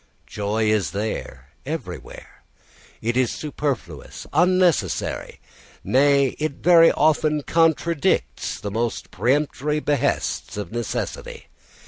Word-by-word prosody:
Joy 105 +2 -1
is 95 -8 0
there 105 +2 -4
everywhere; - - -7 0.6
it 120 +2 0
is 130 -2 +2
superfluous, 140 - -4
unnecessary; 175 - +1 0.4
nay, 140 0 +4
it 155 -1 -1
very 165 +2 +6
often 155 0 +2
contradicts 165 - +1
the 100 +1 -5
most 115 +2 -3
peremptory 150 +2 0
behests 145 -7 -1
of 100 -5 -5
necessity. 120 -1 -5
140 Hz, 95 wpm, -23 LUFS, 110-155 Hz, 0.6 s, very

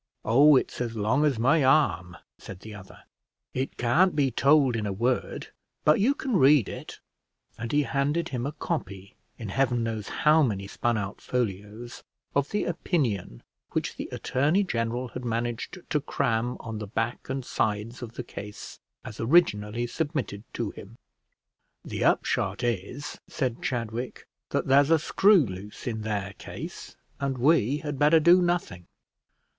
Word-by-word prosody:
"Oh, 140 +6 +6
it's 130 - 0
as 115 -2 -3
long 115 +8 +2
as 140 -5 +1
my 140 +7 +3
arm," 90 - +2 0.2
said 95 -1 -10
the 110 +1 -9
other; 95 -2 -13 0.5
"it 130 +1 -3
can't 155 +10 +3
be 140 -3 +2
told 140 0 +4
in 110 -2 -2
a - - -2
word, 120 +6 -1 0.4
but 150 +4 +5
you 255 +8 +3
can 260 -7 -1
read 135 - +5
it;" - - -8 0.6
and 115 0 -5
he 145 0 +3
handed 145 +5 0
him 125 -1 -3
a - - -3
copy, 100 - -5 0.2
in 110 -4 -6
heaven 125 +1 +1
knows 110 -2 -3
how 155 +1 +4
many 100 -8 0
spun 115 +3 -1
out 100 -1 -5
folios, 110 0 -4 0.3
of 140 0 +1
the 210 - -1
opinion 120 - -2 0.3
which - - -2
the - - -6
attorney 150 +10 +1
general 120 -5 -2
had 125 +2 -7
managed 120 +4 -3
to 150 -3 +2
cram 120 -4 -1
on 110 -1 -6
the 105 - -5
back 115 +5 -3
and 135 -1 -3
sides 110 +4 -2
of 115 -2 -7
the 125 - -5
case 105 -3 -9 0.3
as 110 - -8
originally 115 -5 +2
submitted 135 -7 -3
to 115 -4 -3
him. 110 +4 -12 0.9
"The - - -3
upshot - - +1
is," 120 +5 -3
said 130 -5 -2
Chadwick, 120 -1 -4 0.2
"that - - -1
there's 140 +2 +5
a 165 - +6
screw 190 +1 +4
loose 95 +1 -8
in 110 -3 -3
their 100 -3 -3
case, - - -8 0.2
and 135 -2 -2
we 140 0 +3
had 145 -2 -4
better 150 +2 +6
do 175 +3 +6
nothing. 175 - -1
120 Hz, 160 wpm, -27 LUFS, 110-145 Hz, 0.9 s, Oh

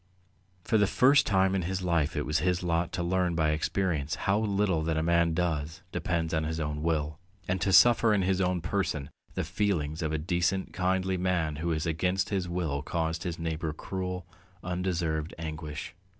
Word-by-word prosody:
For 110 - +2
the 100 - +4
first 140 +7 +5
time 95 -1 +3
in 95 - +1
his 95 +2 -2
life 85 -3 +1
it 75 - -1
was 75 0 +1
his 90 +2 0
lot 85 0 0
to 90 -3 -1
learn 90 0 +1
by 80 -2 +2
experience 80 -2 -1
how 100 +2 +1
little 100 -5 +1
that 80 0 -1
a 80 - +1
man 85 -1 +2
does 80 -3 -2
depends 85 -2 -1
on 80 -1 +1
his 80 +1 -2
own 75 -1 -2
will, 75 -1 -1 0.3
and 90 -1 -1
to 95 - +1
suffer 115 +2 +6
in 100 -3 +3
his 95 0 +1
own 90 -1 +1
person 80 -6 -2 0.2
the - - 0
feelings 85 -4 -1
of 80 -2 -1
a 80 - 0
decent 90 +4 0
kindly 95 0 0
man 90 -4 0
who 85 +3 -2
has 80 -1 -1
against 90 +4 0
his 95 -3 -1
will 80 -5 -1
caused 80 +2 -2
his 85 -2 -3
neighbour 80 -1 -3
cruel, 90 +1 -4 0.4
undeserved 85 -3 -2
anguish. 80 -1 -6
85 Hz, 190 wpm, -29 LUFS, 80-95 Hz, 0.4 s, suffer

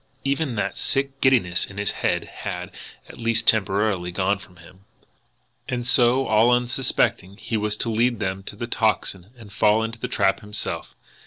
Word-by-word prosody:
Even 140 -2 -1
that 100 -2 -2
sick 135 0 -1
giddiness 115 -10 +3
in 95 - -12
his 100 -1 0
head - - -1
had, - - -6 0.4
at - - -13
least 115 0 0
temporarily, 100 -3 +2
gone 100 +2 0
from 90 -2 -16
him. 90 +3 -17 0.8
And 120 -1 -2
so, 125 +1 +4
all 110 +1 +4
unsuspectingly, 120 -5 +1
he 115 - -4
was 105 0 0
to 115 - -1
lead 120 +2 +2
them 95 -2 -2
to - - -5
the 120 - -4
Tocsin 100 -5 -1
and 105 -4 -13
fall 110 +2 +3
into 115 0 -5
the - - -3
trap 95 - +1
himself! 105 -1 -4
110 Hz, 170 wpm, -23 LUFS, 100-120 Hz, 0.8 s, so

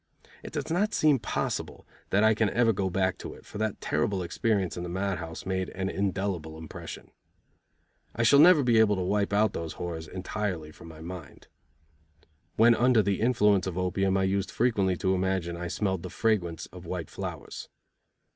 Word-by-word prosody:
It - - -9
does - - -4
not 200 +6 +1
seem 150 -4 +4
possible 105 - -3 0.2
that 100 +2 +3
I 110 0 +6
can 110 -1 +1
ever 115 0 +3
go 95 -1 -1
back 95 0 0
to - - -7
it, - - -16
for 105 - -8
that 110 -2 -1
terrible 100 -6 0
experience 95 +1 0
in 85 - -5
the 90 - -5
mad 95 +1 -2
house 80 -2 -7
made 95 -1 -1
an 95 0 -3
indelible 95 -5 -2
impression. 80 -1 -9 1.0
I 115 - 0
shall 140 +5 +6
never 160 -1 +7
be 120 -3 +4
able 105 -2 +4
to 95 - -2
wipe 100 +2 0
out 105 0 +2
those 80 -1 -4
horrors 80 -2 -5
entirely 90 -3 -4
from 85 - -14
my 80 -1 -11
mind. 85 -3 -9 1.1
When 115 +2 +6
under 120 -2 +4
the 100 0 0
influence 105 -5 +3
of 90 -1 -4
opium 95 +1 +1
I 95 - +1
used 95 0 0
frequently 100 -7 +1
to 95 +1 +1
imagine 95 -2 -1
I 90 +1 -4
smelled 95 -1 -1
the 90 - -6
fragrance 90 -6 0
of - - -10
white - - -5
flowers. - - -7
95 Hz, 185 wpm, -28 LUFS, 90-110 Hz, 1.1 s, never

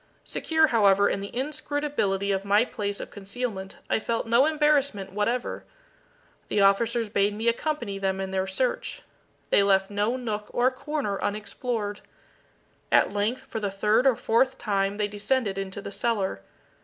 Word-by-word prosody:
Secure, 320 -1 +2
however, 200 -6 +4
in - - 0
the 200 0 -6
inscrutability 280 -7 -1
of 195 0 0
my 205 +3 +4
place 205 -4 -4
of - - -7
concealment, 200 -1 -5
I - - +1
felt 230 +1 -2
no 235 +5 +4
embarrassment 285 -10 +1
whatever. 230 +5 -1 0.8
The - - 0
officers 225 +4 +3
bade 205 0 +1
me 225 +2 -2
accompany 235 -5 -1
them 190 -1 -1
in 190 0 -3
their 190 0 -1
search. 245 +7 -2 0.5
They - - +6
left 195 0 +3
no 210 +5 0
nook 215 -4 -4
or 250 +2 +2
corner 265 -6 -3
unexplored. 210 0 -3 0.9
At - - +4
length, 210 +5 -1
for 225 - -5
the 205 -2 -1
third 210 +6 +2
or 260 - +5
fourth 260 +4 +2
time 200 -3 0
they 210 -1 0
descended 205 0 -1
into 195 +1 -5
the - - -6
cellar. 200 - -1
210 Hz, 155 wpm, -26 LUFS, 200-250 Hz, 0.9 s, They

